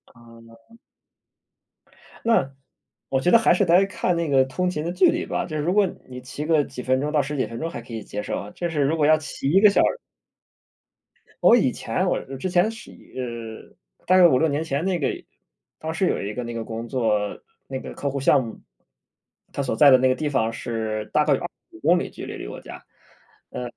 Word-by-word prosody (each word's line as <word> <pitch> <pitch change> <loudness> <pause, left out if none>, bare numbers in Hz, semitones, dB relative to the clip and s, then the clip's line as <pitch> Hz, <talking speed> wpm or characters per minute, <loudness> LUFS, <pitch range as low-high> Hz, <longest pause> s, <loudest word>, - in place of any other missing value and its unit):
嗯， 115 -1 -16
那 115 - -16 1.7
那 225 -13 +2 0.6
我 135 - +1
觉 180 - +2
得 230 - +8
还 225 - +4
是 195 +3 +2
该 180 +3 +5
看 185 -2 -1
那 170 -2 -1
个 135 -2 +4
通 180 +7 -1
勤 155 -4 -3
的 170 - -2
距 180 - +4
离 - - -2
吧， - - -2
就 155 -3 -5
是 150 - -2
如 175 +4 +1
果 205 -1 +4 0.2
你 125 0 -9
骑 140 +4 -6
个 155 -2 +3
几 130 -2 -8
分 130 +1 +1
钟 150 +1 -2
到 150 -2 +3
10 145 +2 -4
几 130 - +1
分 115 - -7
钟 165 - -3
还 120 - -7
可 120 0 -12
以 110 -2 -5
接 105 +1 -5
受 - - -3
啊， 105 - -8
就 175 -1 -4
是 155 -3 -1
如 140 +4 +2
果 150 - +2
要 155 +1 +5
骑 145 -2 -4
1 190 - +6
个 210 - +8
小 195 - +3
时 - - +1 1.5
我 - - +7
以 - - +2
前， - - -2
我 - - +1 0.2
之 185 - -3
前 180 +4 +3
是 225 +1 -10
一 - - -13
呃， 115 -3 -7 0.3
大 185 - +4
概 180 -2 +8
5-6 160 +1 +3
年 145 +2 -1
前 155 +1 -2
那 185 -3 0
个 135 - 0 0.7
当 160 - -4
时 175 +3 0
有 - - 0
一 105 +2 -5
个 125 - -3
那 120 0 -6
个 115 -1 -4
工 115 +1 -6
作 105 -5 -1 0.2
那 135 -1 -5
个 - - -8
客 140 - -3
户 140 - -3
项 135 0 +4
目。 115 -2 -9 0.9
他 140 - -2
所 130 -4 -2
在 140 +4 +7
的 130 - +8
那 130 +1 +2
个 130 - +2
地 150 +2 -2
方 115 -5 0
是， 110 -2 -4
大 150 - +3
概 150 - +3
有 - - +1
25 335 - -10
公 175 - +4
里 - - -4
距 - - -9
离 - - -7
离 - - -7
我 - - -8
家， - - -11 0.6
呃 - - -6
140 Hz, 245 characters per minute, -23 LUFS, 120-170 Hz, 1.7 s, 得